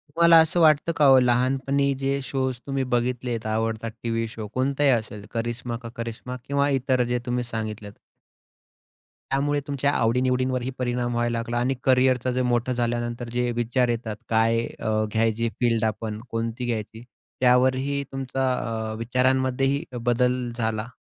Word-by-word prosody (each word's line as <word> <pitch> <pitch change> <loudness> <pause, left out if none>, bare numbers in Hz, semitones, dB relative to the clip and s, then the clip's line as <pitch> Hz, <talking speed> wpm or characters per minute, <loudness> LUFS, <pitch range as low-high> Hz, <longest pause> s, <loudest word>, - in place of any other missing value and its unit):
तुम्हाला 170 0 +7
असं 160 +2 +1
वाटतं 155 0 +4
का 150 - +4
हो? 135 -1 +8
लहानपणी 130 +3 +2
जे 135 0 0
शोज 130 -1 -2
तुम्ही 135 -1 -1
बघितलेत 120 -1 -1
आवडतात 110 +1 -1
टी-व्ही 115 -1 -1
शो 110 -1 -7
कोणताही 140 +2 +1
असेल, 110 -4 -1
करिश्मा 120 +1 -3
का 115 - -6
करिश्मा 115 +2 -6
किंवा 140 0 +1
इतर 130 -2 +1
जे 120 0 -1
तुम्ही 125 0 -1
सांगितलेत 110 -3 -5 1.4
त्यामुळे 145 +2 +1
तुमच्या 140 0 0
आवडी-निवडींवरही 125 +2 +1
परिणाम 120 -1 -1
व्हायला 120 0 0
लागला 120 +1 -3
आणि 125 +3 +1
करियरचं 130 -1 +3
जे 130 - 0
मोठं 125 0 +1
झाल्यानंतर 120 0 -2
जे 125 0 0
विचार 120 +1 +1
येतात, 115 -2 -2
काय 115 0 +3 0.2
अ, 110 0 0
घ्यायची 115 +1 +1
फील्ड 115 -2 +2
आपण 110 0 -3
कोणती 115 +2 -3
घ्यायची, 110 -1 -4 0.4
त्यावरही 130 +3 +3
तुमचा 135 0 -1 0.4
अ, - - -4
विचारांमध्येही 130 +3 +1
बदल 125 +1 +1
झाला? 110 -1 -2
125 Hz, 145 wpm, -24 LUFS, 115-130 Hz, 1.4 s, हो